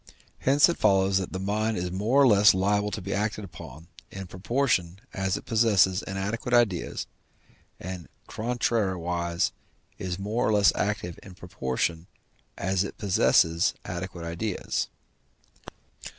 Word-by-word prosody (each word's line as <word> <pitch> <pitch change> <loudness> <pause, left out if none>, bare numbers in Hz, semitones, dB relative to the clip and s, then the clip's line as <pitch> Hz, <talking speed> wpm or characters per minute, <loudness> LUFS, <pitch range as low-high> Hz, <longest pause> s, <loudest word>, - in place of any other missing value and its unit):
Hence 140 +2 +5
it 170 - -1
follows 95 0 +3
that 95 - -5
the 95 - -4
mind 110 +3 -1
is 90 0 -3
more 105 +9 +1
or 135 - +7
less 105 -3 +6
liable 100 +2 +1
to 105 -2 -5
be - - -3
acted 105 +1 -2
upon, 80 -4 -11 0.2
in 95 0 -7
proportion 95 -2 -1 0.2
as 95 -1 -1
it - - -10
possesses 105 -5 +3
inadequate 105 +5 -2
ideas, 105 -8 +1 0.7
and, 90 -1 -7 0.2
contrariwise, 95 -7 -1 0.5
is 90 -2 -3
more 105 +4 -1
or 110 - +2
less 105 -1 +5
active 100 -5 -2
in 95 -2 -12
proportion 80 -1 -3 0.5
as 95 +1 0
it 100 - -7
possesses 85 -3 +3
adequate 85 -1 -6
ideas. 90 +4 -2
95 Hz, 135 wpm, -27 LUFS, 90-105 Hz, 0.7 s, or